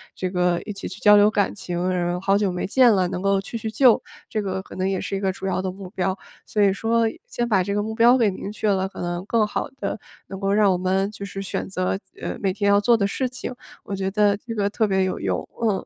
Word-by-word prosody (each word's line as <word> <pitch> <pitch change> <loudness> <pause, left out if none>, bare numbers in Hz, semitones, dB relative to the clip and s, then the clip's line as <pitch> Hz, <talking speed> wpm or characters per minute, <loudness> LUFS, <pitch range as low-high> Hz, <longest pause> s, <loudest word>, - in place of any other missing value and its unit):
这 185 - -2
个 180 -1 +1
一 210 - -6
起 195 - -6
去 190 - -8
交 210 -1 +7
流 205 +1 +6
感 205 -2 +1
情， 180 -2 -3
然后 175 -1 -1
好 195 +1 +3
久 205 -2 +1
没 180 - -3
见 250 +4 +5
了， 190 -3 +3
能 180 - -4
够 195 0 +2
叙叙 220 +2 -5
旧， 240 +2 +5 0.3
这 215 - -1
个 190 -1 -3
可 - - -12
能 190 +1 0
也 190 -1 -1
是 - - -3
一 - - -3
个 195 -1 0
主 190 - -8
要 190 -1 0
的 190 - -2
目 190 0 -9
标。 190 0 -1 0.3
所 210 - +1
以 200 - +5
说 225 +4 +1 0.2
先 240 - -2
把 200 -5 +3
这 200 +2 -2
个 205 - 0
目 220 +1 -4
标 235 +3 +5
给 225 -5 +3
明 190 +1 -6
确 215 0 -1
了， 190 -1 +1
可 - - -9
能 175 +1 -3
更 225 0 +2
好 210 - -3
地 200 -1 -3 0.3
能 195 - -7
够 195 0 0
让 205 -1 +4
我 180 - +1
们 190 +2 0
就 200 -1 -7
是 195 0 -6
选 195 - -3
择， 185 0 -1 0.2
呃， - - -4
每 195 -2 0
天 200 +1 -1
要 200 0 +5
做 235 +3 +4
的 200 - +1
事 255 +6 -1
情。 255 0 -6 0.3
我 200 - -4
觉 190 0 -2
得 205 0 +2
这 230 +2 -7
个 200 -2 +1
特 215 +1 +1
别 190 -1 +2
有 185 - -2
用， 95 -2 -2
嗯。 210 -4 0
195 Hz, 300 characters per minute, -23 LUFS, 190-210 Hz, 0.3 s, 交